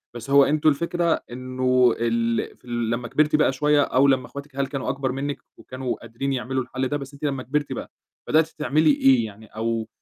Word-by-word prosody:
بس 120 +3 -8
هو 140 0 +7
أنتم 155 +2 +3
الفكرة 170 +2 0
إنه 130 -1 +2
ال 115 0 -1
في - - -25
ال 120 -1 -2
لمّا 120 +1 -2
كبرتِ 150 +2 +2
بقى 150 -3 +3
شوية، 150 +1 +3
أو 135 0 +3
لمّا 130 -2 +2
اخواتِك 140 -1 -10
هل 140 -1 0
كانوا 135 -2 -4
أكبر 135 -1 -1
منِّك 140 +2 -3 0.2
وكانوا 130 -1 -4
قادرين 125 +4 -3
يعملوا 130 0 -2
الحل 130 +1 -3
ده، 145 - -1
بس 140 0 -9
أنتِ 140 - -14
لمّا 135 -3 -1
كبرتِ 145 +2 -2
بقى، - - -7 0.4
بدأتِ 160 +1 +3
تعملي 155 0 +2
إيه 130 -5 +4
يعني؟ 110 +1 -11
أو 115 0 -3
135 Hz, 205 wpm, -24 LUFS, 125-145 Hz, 0.4 s, هو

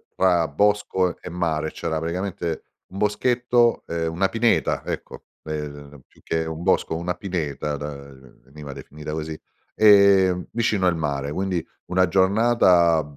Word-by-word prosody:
tra 90 -3 +3
bosco 95 +1 +1
e - - -7
mare. 80 -3 -2
C'era 80 -1 -3
praticamente 85 0 -3 0.2
un 95 - -11
boschetto 120 +3 +2
ehm, 85 -1 -2
una 95 +3 +1
pineta 115 0 +1
ecco, - - -6 0.2
ehm, 75 -2 -7
più - - -25
che 80 0 -1
un 80 +1 -6
bosco, 95 -3 +1
una 85 +2 -2
pineta 75 -6 -3
da 75 +1 -5 0.5
veniva 70 +1 -10
definita 75 +2 -9
così, 80 0 -5 0.4
ehm, 100 -4 +5
vicino 110 -4 0
al 85 - +2
mare 70 -3 -2
quindi, 90 0 -2 0.2
una 90 0 +2
giornata 95 -4 +4
85 Hz, 135 wpm, -23 LUFS, 80-95 Hz, 0.5 s, ehm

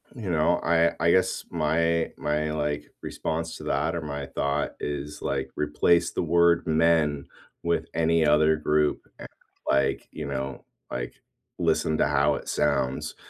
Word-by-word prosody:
you 105 -7 -4
know, 85 +2 +2
I 85 0 +3
I 85 +1 +3
guess 95 +1 +1
my 80 0 +1
my, 75 +1 -1
like, 75 -1 -3
response 80 +1 -3
to - - -10
that, - - 0
or 85 - -2
my 70 -2 -5
thought 70 +1 -1
is, 75 0 -5
like, 65 -1 -2
replace 85 +3 +2
the - - -2
word 85 0 +3
men 80 -3 +2 0.4
with 85 0 0
any 80 0 +2
other 75 +1 +4
group, 75 -1 +1 0.2
and, - - -8 0.4
like, 70 0 +1
you - - -6
know, 65 -1 -4 0.3
like, - - -4 0.5
listen 80 - +1
to - - +4
how 75 0 +2
it - - -7
sounds. 70 -3 0
75 Hz, 155 wpm, -26 LUFS, 75-85 Hz, 0.5 s, other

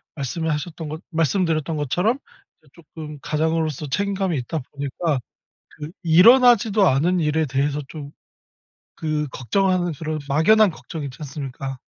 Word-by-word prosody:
말씀을 160 +4 -3
하셨던 155 +1 -4
거 155 - -5
말씀드렸던 165 -1 0
것처럼 180 - 0 0.4
이제 150 - -25
쪼끔 155 -2 -10
가장으로서 155 -1 -1
책임감이 195 -1 -1
있다 150 +6 -3
보니까 140 +1 -2 0.5
그 150 +2 -9
일어나지도 215 +3 +6
않은 170 +7 +2
일에 155 0 +1
대해서 140 +2 -1
좀 145 -3 -8 0.9
그 155 -2 -1
걱정하는 180 - 0
그런 155 +1 -4
막연한 185 +8 +4
걱정이 160 -2 -7
있지 130 -2 -8
않습니까? 135 -2 -6
155 Hz, 330 characters per minute, -22 LUFS, 145-180 Hz, 0.9 s, 일어나지도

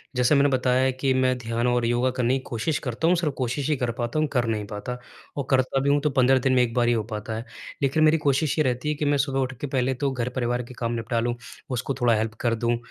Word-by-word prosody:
जैसा 125 +4 +3
मैंने 140 0 +4
बताया 130 0 +2
कि 130 +1 0
मैं 130 -1 +2
ध्यान 115 0 -2
और 120 -1 +1
योगा 120 +2 +1
करने 125 +2 +2
की - - -4
कोशिश 120 +6 -1
करता 125 +7 -1
हूँ, 180 - +4
सिर्फ़ 165 -4 -1
कोशिश 130 +3 -2
ही 150 - +3
कर 125 -2 -1
पाता 120 +5 -1
हूँ, 155 - +2
कर 125 -3 +2
नहीं 110 -2 -1
पाता, 105 +5 -5 0.4
और 140 - -2
करता 130 0 +2
भी 140 - +1
हूँ 145 +1 +4
तो 150 - +1
15 130 +1 +5
दिन 130 - +3
में 125 - +5
1 115 -1 -2
बार 120 -1 +2
ही 120 - +4
हो 110 -2 0
पाता 110 +1 -4
है। 115 - -6 0.4
लेकिन 140 +3 +2
मेरी 155 +1 +5
कोशिश 140 +2 +1
ये - - +4
रहती 125 +2 -1
है 150 - 0
कि - - +2
मैं 145 0 +2
सुबह 135 -2 -2
उठ 130 0 -1
के 145 - -2
पहले 130 -1 0
तो 135 - +1
घर-परिवार 125 -1 -2
के 120 - -11
काम 115 -1 -3
निपटा 115 0 -1
लूँ, 120 +1 -1 0.3
उसको 130 +1 -2
थोड़ा 120 -1 +4
हेल्प 110 +1 -1
कर 115 -1 +2
दूँ, 115 +1 0
125 Hz, 275 wpm, -25 LUFS, 120-135 Hz, 0.4 s, 15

